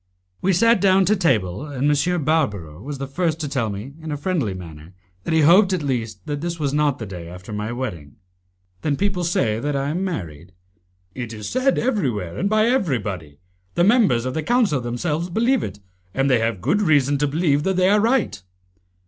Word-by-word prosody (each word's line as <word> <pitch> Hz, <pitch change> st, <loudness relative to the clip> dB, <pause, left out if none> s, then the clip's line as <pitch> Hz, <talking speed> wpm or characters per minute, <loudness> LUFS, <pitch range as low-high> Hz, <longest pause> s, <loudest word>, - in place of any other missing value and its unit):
We 190 Hz, -, +2 dB
sat 230 Hz, +6 st, +4 dB
down 190 Hz, -1 st, +4 dB
to 210 Hz, +4 st, +3 dB
table, 115 Hz, -, 0 dB
and 145 Hz, -2 st, -2 dB
M. 175 Hz, +2 st, 0 dB
Barbaro 105 Hz, -, -1 dB
was 140 Hz, +3 st, -6 dB
the 135 Hz, -, -4 dB
first 160 Hz, +3 st, -1 dB
to 150 Hz, -, -2 dB
tell 130 Hz, -6 st, -1 dB
me 105 Hz, +7 st, -6 dB
in 160 Hz, -1 st, -6 dB
a 145 Hz, -, -2 dB
friendly 145 Hz, -, -1 dB
manner 85 Hz, -1 st, -11 dB, 0.3 s
that -, -, -1 dB
he 160 Hz, -, +4 dB
hoped 185 Hz, +5 st, +6 dB
at 175 Hz, -5 st, -1 dB
least 115 Hz, -8 st, -3 dB
that 145 Hz, -1 st, -3 dB
this 170 Hz, 0 st, -3 dB
was 140 Hz, -2 st, -1 dB
not 145 Hz, -2 st, +2 dB
the 110 Hz, -, -6 dB
day 90 Hz, -4 st, -8 dB
after 90 Hz, +4 st, -9 dB
my 105 Hz, +2 st, -3 dB
wedding. 100 Hz, -, -5 dB, 0.7 s
"Then 145 Hz, -2 st, 0 dB
people 190 Hz, +1 st, -1 dB
say 115 Hz, -10 st, +1 dB
that 145 Hz, +3 st, -2 dB
I 140 Hz, +1 st, -1 dB
am 175 Hz, +5 st, -2 dB
married?" 85 Hz, -, -5 dB, 0.6 s
"It 120 Hz, -3 st, -6 dB
is 105 Hz, -1 st, -6 dB
said 260 Hz, +2 st, +1 dB
everywhere 125 Hz, -, -1 dB
and 200 Hz, -, -1 dB
by 215 Hz, 0 st, +3 dB
everybody. 105 Hz, -, -1 dB, 0.4 s
The 175 Hz, -, +3 dB
members 190 Hz, -, +4 dB
of 130 Hz, -, -2 dB
the 160 Hz, -, -1 dB
Council 210 Hz, -, +2 dB
themselves 150 Hz, +8 st, -2 dB
believe 235 Hz, +8 st, +2 dB
it, 100 Hz, 0 st, -6 dB, 0.4 s
and 135 Hz, 0 st, +2 dB
they 125 Hz, -, +4 dB
have 115 Hz, -4 st, -1 dB
good 165 Hz, -, +1 dB
reason 145 Hz, -6 st, +3 dB
to 145 Hz, -, +2 dB
believe 145 Hz, -1 st, +1 dB
that 190 Hz, +4 st, 0 dB
they 185 Hz, 0 st, +3 dB
are 205 Hz, +2 st, +4 dB
right." 225 Hz, -, +1 dB
145 Hz, 205 wpm, -22 LUFS, 110-180 Hz, 0.7 s, hoped